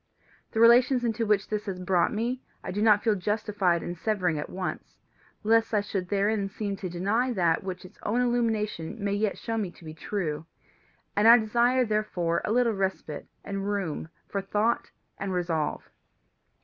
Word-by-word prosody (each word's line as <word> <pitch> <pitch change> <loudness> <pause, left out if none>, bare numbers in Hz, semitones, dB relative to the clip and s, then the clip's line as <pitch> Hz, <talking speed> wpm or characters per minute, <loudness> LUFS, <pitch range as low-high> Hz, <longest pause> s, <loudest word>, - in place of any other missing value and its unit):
The 220 - -2
relations 245 +2 +6
into 225 -1 0
which 205 -2 +2
this 210 0 -3
has 190 -2 -3
brought 180 -1 +2
me 240 +4 -2 0.2
I - - -4
do 205 +3 -2
not 210 -1 +5
feel 225 - +3
justified 205 -3 0
in 175 - -4
severing 180 -3 0
at 150 - -5
once, 185 0 -5 0.5
lest 225 +1 +3
I 205 - +3
should 195 -3 -4
therein 200 0 +1
seem 200 0 -3
to 190 -2 -5
deny 205 +9 0
that 170 -5 +2
which 185 -1 -6
its 185 - -15
own 225 +4 0
illumination 225 -8 0
may 200 -2 -1
yet 205 0 0
show 225 0 -3
me 200 -4 -2
to 175 - -16
be 155 - -7
true, 160 -2 -3 0.7
and 210 +2 +4
I 235 +1 +10
desire 240 +3 +2
therefore 210 -6 0
a - - -1
little 235 0 +3
respite 190 -6 -3 0.2
and 195 0 -3
room 175 -6 -3 0.2
for 200 - -2
thought 210 +4 0 0.3
and 195 -1 -2
resolve. 165 -4 -1
205 Hz, 175 wpm, -27 LUFS, 180-225 Hz, 0.7 s, I